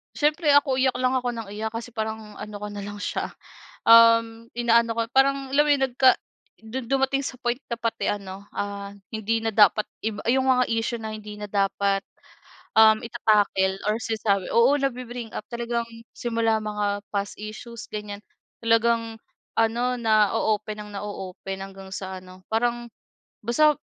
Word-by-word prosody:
siyempre 300 Hz, +1 st, +2 dB
ako 285 Hz, -2 st, +4 dB
iyak 260 Hz, -1 st, +2 dB
lang 255 Hz, +1 st, +2 dB
ako 250 Hz, -1 st, 0 dB
nang 230 Hz, -3 st, -6 dB
iyak 215 Hz, +2 st, -4 dB
kasi 230 Hz, +1 st, -7 dB
parang 220 Hz, -1 st, -4 dB
ano 210 Hz, 0 st, -8 dB
ko 210 Hz, -, -5 dB
na 205 Hz, -1 st, -6 dB
lang 205 Hz, 0 st, -7 dB
siya, -, -, -3 dB, 0.6 s
um, 230 Hz, 0 st, +6 dB
inaano 235 Hz, -1 st, +3 dB
ko 230 Hz, -, -3 dB
yung 240 Hz, -, -37 dB
parang 275 Hz, +1 st, +5 dB, 0.2 s
alam 295 Hz, -, +6 dB
mo 300 Hz, -, -1 dB
yun 280 Hz, -2 st, +3 dB
nagka 255 Hz, +1 st, +5 dB, 0.5 s
dun 230 Hz, +4 st, -6 dB
dumating 270 Hz, +1 st, +1 dB
sa 255 Hz, -, -6 dB
point 245 Hz, +2 st, -2 dB
na 235 Hz, -, -2 dB
pati 230 Hz, -1 st, -1 dB
ano, 195 Hz, -1 st, -6 dB
ah, 200 Hz, 0 st, -4 dB, 0.2 s
hindi 220 Hz, 0 st, -1 dB
na 225 Hz, -1 st, -3 dB
dapat 210 Hz, 0 st, +5 dB, 0.2 s
iba 215 Hz, -1 st, -2 dB
yung 260 Hz, +2 st, +3 dB
mga 250 Hz, 0 st, +3 dB
issue 230 Hz, +1 st, -1 dB
na 220 Hz, -1 st, -5 dB
hindi 210 Hz, -1 st, -9 dB
na 210 Hz, -, -5 dB
dapat, 195 Hz, 0 st, +1 dB, 0.7 s
um, 220 Hz, 0 st, +6 dB
ita-tackle 200 Hz, -4 st, +1 dB
or 215 Hz, +2 st, 0 dB
sinasabi 215 Hz, -4 st, 0 dB
oo, 235 Hz, +3 st, +6 dB
nabi-bring 245 Hz, -3 st, -3 dB
up -, -, -4 dB
talagang 235 Hz, 0 st, -2 dB, 0.3 s
simula 225 Hz, -2 st, 0 dB
mga 205 Hz, -1 st, -2 dB
past 200 Hz, -1 st, -2 dB
issues, 215 Hz, +2 st, -8 dB
ganyan 210 Hz, -1 st, -6 dB, 0.4 s
talagang 230 Hz, 0 st, +2 dB, 0.4 s
ano, 240 Hz, +2 st, +1 dB
na-o-open 215 Hz, -1 st, +2 dB
nang 210 Hz, -, -8 dB
na-o-open 195 Hz, -1 st, -6 dB
hanggang 195 Hz, 0 st, -9 dB
sa 190 Hz, -1 st, -6 dB
ano, 185 Hz, 0 st, -14 dB
parang 240 Hz, +1 st, 0 dB, 0.5 s
basta 300 Hz, +7 st, +4 dB
225 Hz, 165 wpm, -25 LUFS, 205-240 Hz, 0.7 s, um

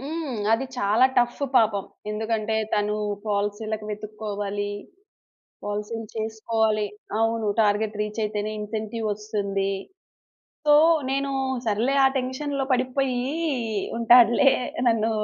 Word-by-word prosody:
హ్మ్. 290 Hz, -4 st, -4 dB
అది 255 Hz, +4 st, +1 dB
చాలా 215 Hz, +5 st, +3 dB
టఫ్ 240 Hz, +3 st, +1 dB, 0.2 s
పాపం 210 Hz, -4 st, +3 dB, 0.3 s
ఎందుకంటే 220 Hz, 0 st, -1 dB, 0.2 s
తను 210 Hz, 0 st, 0 dB, 0.3 s
పాలిసీలకి 210 Hz, +1 st, -2 dB
వెతుక్కోవాలి 205 Hz, -1 st, -4 dB, 0.9 s
పాలిసీ‌లు 210 Hz, +2 st, -4 dB
చేసుకోవాలి. 220 Hz, -1 st, 0 dB, 0.3 s
అవును. 225 Hz, -1 st, +1 dB
టార్గెట్ 210 Hz, 0 st, +2 dB
రీచ్ 210 Hz, +1 st, -3 dB
అయితేనే 210 Hz, 0 st, -2 dB
ఇన్సెంటివ్ 220 Hz, +1 st, -4 dB
ఒస్తుంది. 200 Hz, -2 st, -2 dB, 1.0 s
సో, 295 Hz, -, +7 dB, 0.4 s
నేను 275 Hz, +1 st, 0 dB, 0.4 s
సర్లే 225 Hz, +6 st, +1 dB
ఆ -, -, +7 dB
టెన్షన్‌లో 270 Hz, +2 st, -2 dB
పడిపోయి 255 Hz, 0 st, 0 dB, 0.8 s
ఉంటాడులే 240 Hz, +3 st, +6 dB, 0.4 s
నన్ను 225 Hz, -1 st, +2 dB
220 Hz, 100 wpm, -25 LUFS, 210-240 Hz, 1.0 s, సో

